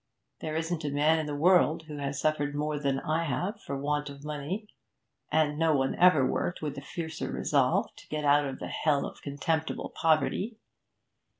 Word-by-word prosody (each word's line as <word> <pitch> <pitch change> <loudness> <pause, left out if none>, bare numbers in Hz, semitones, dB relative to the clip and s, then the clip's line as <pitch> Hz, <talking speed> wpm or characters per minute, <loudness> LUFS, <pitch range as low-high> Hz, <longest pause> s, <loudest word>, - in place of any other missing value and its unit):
There 155 0 -4
isn't 160 0 -2
a 145 - -1
man 150 +3 +3
in 155 - -2
the 145 - -3
world 165 0 +4
has 145 -3 -4
suffered 145 -1 0
more 150 0 -1
than 140 -2 0
I 160 +2 0
have 190 - -2
for 140 -5 -4
want 145 +1 -1
of 140 0 -10
money, 150 +8 -4 0.6
and 150 -1 +2
no 165 -2 +3
one 135 -1 +1
ever 175 -7 +5
worked 175 +6 -1
with 150 -2 -4
a - - -11
fiercer 160 +1 -5
resolve 135 -3 +1
to - - -14
get 150 -1 -3
out 145 0 +4
of 135 -1 -5
the - - -6
hell 145 -3 +1
of - - -9
contemptible 160 +3 -2
poverty. 165 +7 +1
150 Hz, 185 wpm, -29 LUFS, 145-160 Hz, 0.6 s, ever